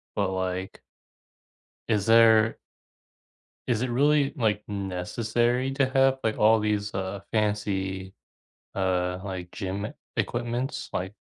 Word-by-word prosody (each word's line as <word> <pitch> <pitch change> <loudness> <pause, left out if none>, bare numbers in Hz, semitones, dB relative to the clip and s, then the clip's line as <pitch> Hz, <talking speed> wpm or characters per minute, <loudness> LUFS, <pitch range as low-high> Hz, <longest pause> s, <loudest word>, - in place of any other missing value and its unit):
but, 100 -2 0
like 95 0 -3 1.1
is 105 -2 +1
there 115 -1 +6 1.1
is 120 -3 +1
it 130 - -1
really, 140 +3 +3
like, 105 -6 0
necessary 110 +6 -1
to 135 -1 +1
have, 135 0 +3
like, 110 -1 0
all 110 +1 +5
these, 105 -1 -1
uh, 95 +1 -3
fancy, 95 -3 -1 0.6
uh, 90 -1 0
like, 95 -2 -6
gym 100 +2 -3
e - - -8 0.2
equipments? 120 +4 -2
Like 95 +2 -3
105 Hz, 115 wpm, -26 LUFS, 95-120 Hz, 1.1 s, there